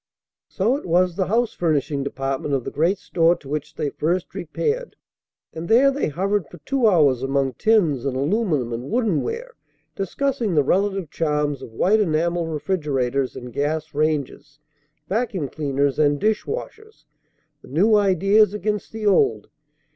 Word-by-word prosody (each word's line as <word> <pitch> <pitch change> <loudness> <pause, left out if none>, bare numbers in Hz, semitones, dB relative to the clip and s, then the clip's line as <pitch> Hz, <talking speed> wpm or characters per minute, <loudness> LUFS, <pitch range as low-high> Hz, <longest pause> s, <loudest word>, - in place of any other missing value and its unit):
So 220 +6 0
it 285 - -9
was 180 +1 +2
the 190 -1 -1
house 230 +2 +1
furnishing 150 -4 0
department 135 +1 -2
of 130 - -2
the - - -5
great 170 +6 +1
store 170 0 +2
to 150 - -15
which 150 +1 -4
they 150 -3 -2
first 170 +4 -2
repaired, 455 - -3 0.6
and 165 +1 -6
there 260 +5 +5
they 280 - -1
hovered 190 +2 -1
for 175 - -13
two 265 -4 +2
hours 145 - +4
among 135 0 0
tins 175 - +2
and 135 -2 -2
aluminum 150 - 0
and 120 +3 -5
wooden 220 -8 +1
ware, 485 +2 -5 0.4
discussing 225 +1 -1
the 145 - +4
relative 195 +1 0
charms 150 -3 -1
of 120 - -9
white 205 - +3
enamel 170 -2 0
refrigerators 140 -6 -1
and 125 -1 -8
gas 155 +3 -2
ranges, 150 -1 -2 0.5
vacuum 200 - -1
cleaners 140 -1 -1
and 145 -1 +3
dish 215 0 0
washers, 440 -1 -7 0.6
the - - -16
new 190 +11 +2
ideas 200 +1 +3
against 210 0 -3
the 220 -1 -5
old. 405 - +2
170 Hz, 155 wpm, -22 LUFS, 145-210 Hz, 0.6 s, there